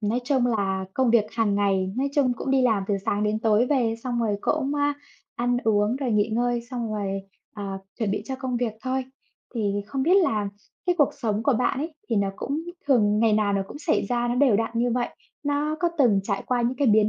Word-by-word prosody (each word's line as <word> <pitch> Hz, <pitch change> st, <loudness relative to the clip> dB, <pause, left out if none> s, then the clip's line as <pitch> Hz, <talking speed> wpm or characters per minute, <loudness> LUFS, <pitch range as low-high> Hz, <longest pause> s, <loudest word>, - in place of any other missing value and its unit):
Nói 225 Hz, +4 st, 0 dB
chung 260 Hz, -3 st, +2 dB
là 195 Hz, -5 st, 0 dB
công 260 Hz, -3 st, +2 dB
việc 230 Hz, -3 st, +5 dB
hàng 225 Hz, -3 st, +1 dB
ngày, 195 Hz, -2 st, +1 dB
nói 275 Hz, +2 st, +1 dB
chung 265 Hz, -4 st, +3 dB
cũng 270 Hz, -, -3 dB
đi 270 Hz, -1 st, +3 dB
làm 220 Hz, -5 st, +2 dB
từ 205 Hz, -, +2 dB
sáng 205 Hz, +1 st, 0 dB
đến 210 Hz, +1 st, +1 dB
tối 220 Hz, +1 st, +3 dB
về, 245 Hz, -5 st, +1 dB
xong 240 Hz, -2 st, -1 dB
rồi 210 Hz, -3 st, +1 dB
cũng, 275 Hz, +2 st, 0 dB
a, 290 Hz, 0 st, +1 dB, 0.4 s
ăn 245 Hz, +1 st, 0 dB
uống 210 Hz, +2 st, +2 dB
rồi 265 Hz, -4 st, -2 dB
nghỉ 210 Hz, 0 st, +2 dB
ngơi, 240 Hz, +1 st, 0 dB
xong 240 Hz, -3 st, -3 dB
rồi, 195 Hz, -1 st, -2 dB, 0.3 s
ờ, 205 Hz, -, -6 dB, 0.4 s
chuẩn 215 Hz, -4 st, 0 dB
bị 205 Hz, -, -1 dB
cho 265 Hz, -1 st, -4 dB
công 255 Hz, -2 st, -3 dB
việc 235 Hz, -3 st, -1 dB
thôi. 260 Hz, 0 st, -1 dB, 0.5 s
Thì 230 Hz, -, -2 dB, 0.3 s
không 265 Hz, +5 st, -2 dB
biết 355 Hz, +6 st, +4 dB
là 220 Hz, -, +2 dB, 0.4 s
cái 355 Hz, -, +3 dB
cuộc 290 Hz, -, +5 dB
sống 225 Hz, -6 st, -1 dB
của 275 Hz, -, +3 dB
bạn 255 Hz, +3 st, +1 dB
ấy 315 Hz, +1 st, -4 dB
thì 230 Hz, -, 0 dB
nó 200 Hz, -1 st, +2 dB
cũng 290 Hz, +3 st, -2 dB, 0.3 s
thường 210 Hz, -7 st, +3 dB
ngày 225 Hz, 0 st, +3 dB
nào 210 Hz, -1 st, +2 dB
nó 195 Hz, -1 st, +1 dB
cũng -, -, -8 dB
xảy 320 Hz, +1 st, 0 dB
ra, 240 Hz, -1 st, 0 dB
nó 240 Hz, -, 0 dB
đều 250 Hz, -5 st, +4 dB
đặn 225 Hz, +1 st, 0 dB
như 240 Hz, +1 st, +1 dB
vậy. 245 Hz, 0 st, 0 dB, 0.3 s
Nó 290 Hz, +1 st, 0 dB
có 345 Hz, -, +3 dB
từng 220 Hz, -8 st, +4 dB
trải 200 Hz, 0 st, -2 dB
qua 245 Hz, -1 st, +1 dB
những 245 Hz, +2 st, 0 dB
cái 280 Hz, -, +1 dB
biến 215 Hz, 0 st, +5 dB
240 Hz, 240 wpm, -25 LUFS, 210-265 Hz, 0.5 s, việc